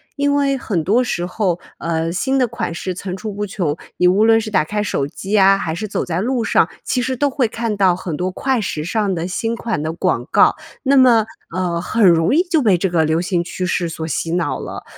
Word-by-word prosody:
因 285 0 +1
为 280 -1 +1
很 185 -10 -2
多 225 +8 +3
时 175 -7 -2
候， 180 -2 -1 0.2
呃， 165 0 -2
新 265 +9 0
的 250 - +3
款 230 -6 -4
式 180 +1 -4
层 185 -1 -5
出 210 +2 -5
不 205 +1 -3
穷， 175 -7 -2 0.2
你 180 - +4
无 200 +4 +4
论 225 0 +5
是 215 - -5
打 190 -6 +2
开 210 +7 -2
手 140 -9 -1
机 195 +8 -2
啊， 195 0 +5
还 160 -3 -3
是 215 +5 -4
走 - - -2
在 175 +1 -2
路 245 0 0
上， - - +2
其 250 - -1
实 260 +1 -1
都 285 +3 +1
会 265 -3 0
看 225 -1 -3
到 185 -3 +4
很 175 -4 -5
多 185 +2 -2
快 260 +5 0
时 155 -7 -3
尚 205 +2 0
的 170 -1 -3
新 225 +5 -2
款 225 -10 -3
的 160 +1 -2
广 - - -1
告。 - - +5 0.3
那 275 0 +3
么， 235 -4 +5 0.3
呃， 175 -2 -1
很 215 +6 0
容 165 +7 +3
易 330 - +5
就 345 -5 +1
被 195 -6 +3
这 190 - 0
个 165 -2 +2
流 160 +2 +1
行 175 -2 0
趋 180 +1 -4
势 175 -2 0
所 160 0 -5
洗 165 +2 -2
脑 175 -1 -1
了。 - - -7
195 Hz, 260 characters per minute, -19 LUFS, 175-230 Hz, 0.3 s, 论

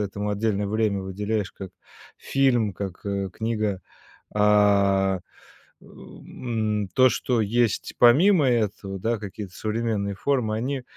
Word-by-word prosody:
этому 105 +1 -3
отдельное 105 -1 -1
время 105 -2 0
выделяешь, 100 +2 -3
как 95 -2 -9 0.5
фильм, 125 -6 +1
как, 95 -2 -7
э, 100 -1 -2
книга. 110 -3 -2 0.5
А, 100 -2 +3 0.6
э, - - -21
м, 110 -4 -4
то, 130 0 +6
что 120 0 0
есть 110 -1 0
помимо 145 +6 +5
этого, 105 -4 -1
да, 115 +4 -1
какие-то 100 -2 -8
современные 110 -2 -2
формы, 115 -2 0
они, 130 +4 -3
105 Hz, 120 wpm, -24 LUFS, 100-115 Hz, 0.6 s, то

